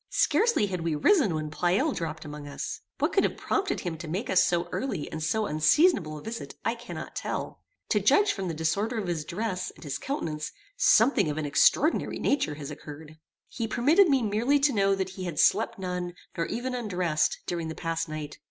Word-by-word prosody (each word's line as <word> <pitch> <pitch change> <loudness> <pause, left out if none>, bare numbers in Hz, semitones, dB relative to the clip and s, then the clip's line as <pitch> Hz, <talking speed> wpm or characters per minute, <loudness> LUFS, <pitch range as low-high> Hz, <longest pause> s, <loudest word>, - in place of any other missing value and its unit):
Scarcely 470 - +3
had 185 -3 -3
we 165 -2 -1
risen 210 - +3
when 155 -1 -3
Pleyel 180 - +1
dropped 160 - -4
among 150 -1 -8
us. 140 - -5 0.2
What - - 0
could - - +4
have - - -1
prompted 390 -2 -1
him 165 -4 -4
to 170 - -7
make 190 +10 -3
us 185 - +5
so 175 0 +1
early 255 - -3
and 160 - -5
so 190 +8 0
unseasonable 155 - +3
a 150 - -10
visit 230 +1 -6
I - - +2
cannot - - -8
tell. - - -4 0.3
To - - +3
judge 415 0 +4
from 195 -2 -4
the 165 - -3
disorder 200 +9 0
of 215 - -2
his 170 -3 -2
dress, 185 +3 -3
and - - -14
his 145 -3 -4
countenance, 155 - -4 0.2
something 275 - +4
of 150 - -3
an 155 - -2
extraordinary 295 - +3
nature 260 - 0
has 145 0 -7
occurred. 150 +1 -10 0.3
He 230 -1 -4
permitted 310 - +4
me 270 -4 +3
merely 230 +7 +2
to 280 -1 +3
know 195 -2 +3
that 190 -1 -2
he 185 0 -7
had 170 -4 -5
slept - - +3
none, 180 -2 -4 0.2
nor 165 - -1
even 250 +2 -3
undressed, 180 -10 0
during 170 -2 -3
the 160 - -5
past 165 -1 -2
night. 155 -1 -6
180 Hz, 205 wpm, -27 LUFS, 155-230 Hz, 0.3 s, us